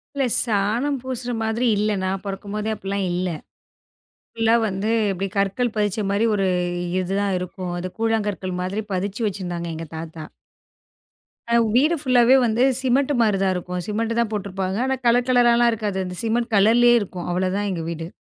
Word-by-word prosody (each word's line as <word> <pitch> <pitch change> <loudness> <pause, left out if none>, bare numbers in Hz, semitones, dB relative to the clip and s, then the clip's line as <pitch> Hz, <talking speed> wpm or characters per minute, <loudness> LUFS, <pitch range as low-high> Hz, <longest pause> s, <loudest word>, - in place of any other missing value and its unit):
இல்ல. 275 -1 +1 0.2
சாணம் 230 +6 0
பூசுற 250 -1 -4
மாதிரி 225 +3 0
இல்ல. 210 +1 +1
நான் 190 0 -2
பொறக்கும்போதே 205 +2 -4
அப்பிடிலாம் 200 -1 -3
இல்ல. 180 +1 -1 1.1
ஃபுல்லா 225 0 +3
வந்து 195 +2 -3 0.2
இப்பிடி 195 +1 -2
கற்கள் 200 +5 +1
பதிச்சமாரி 205 0 0
ஒரு 195 -2 +1 0.5
இது 185 +1 -3
தான் 200 -1 0
இருக்கும். 180 0 -6
அது 180 +1 -4
கூழாங்கற்கள் 210 -5 -1
மாதிரி 190 +4 -2
பதிச்சி 195 +4 -3
வச்சிருந்தாங்க 175 -4 -4
எங்க 165 0 -6
தாத்தா! 160 -1 -7 1.3
அ - - +5 0.2
வீடு 300 +7 +4
ஃபுல்லாவே 255 -2 +5
வந்து 230 +2 +2 0.2
சிமெண்ட் 270 +2 +2
மாரிதான் 195 -4 +2
இருக்கும். 180 0 -4
சிமெண்ட்டு 225 +2 -1
தான் 225 -2 -2
போட்டுருப்பாங்க. 195 -2 -3
ஆனா, 265 - 0
கலர் 245 +1 +3
கலரலாம் 240 -1 +4
இருக்காது. 205 -3 -3
அந்த 180 -1 -6
சிமெண்ட் 230 +1 -1
கலர்லேயே 235 +4 +5
இருக்கும். 180 -3 -6
அவ்ளதான் 185 +3 0
எங்க 170 -3 -3
வீடு. 165 -1 -5
205 Hz, 150 wpm, -22 LUFS, 185-235 Hz, 1.3 s, அ